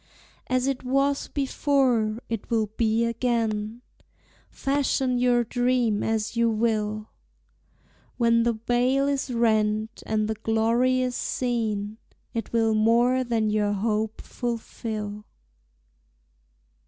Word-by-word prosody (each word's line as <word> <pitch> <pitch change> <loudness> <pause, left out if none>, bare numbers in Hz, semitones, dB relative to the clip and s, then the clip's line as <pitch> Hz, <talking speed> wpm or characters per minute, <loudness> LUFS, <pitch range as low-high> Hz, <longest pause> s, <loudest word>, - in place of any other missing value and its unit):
As 255 0 +1
it 270 -2 -1
was 275 +2 +1
before, 260 -6 +1
it 225 -3 -4
will 220 -3 0
be 225 0 +2
again, 230 -1 -1 0.7
Fashion 270 -2 0
your 245 -1 +3
dream 245 -2 +1
as 220 0 -1
you 235 0 +3
will; 215 -1 -1 1.1
When 230 -1 +3
the 235 0 +2
veil 245 +5 +1
is 280 -1 -1
rent, 220 -1 +1
and 215 -1 0
the 220 - -1
glory 230 +4 +1
is 250 -1 -1
seen, 220 -4 -2 0.3
It 230 - -4
will 225 -1 +2
more 235 +4 +3
than 225 -3 0
your 210 -1 +1
hope 215 +1 -1
fulfil. 220 -3 -5
230 Hz, 110 wpm, -25 LUFS, 215-250 Hz, 1.1 s, your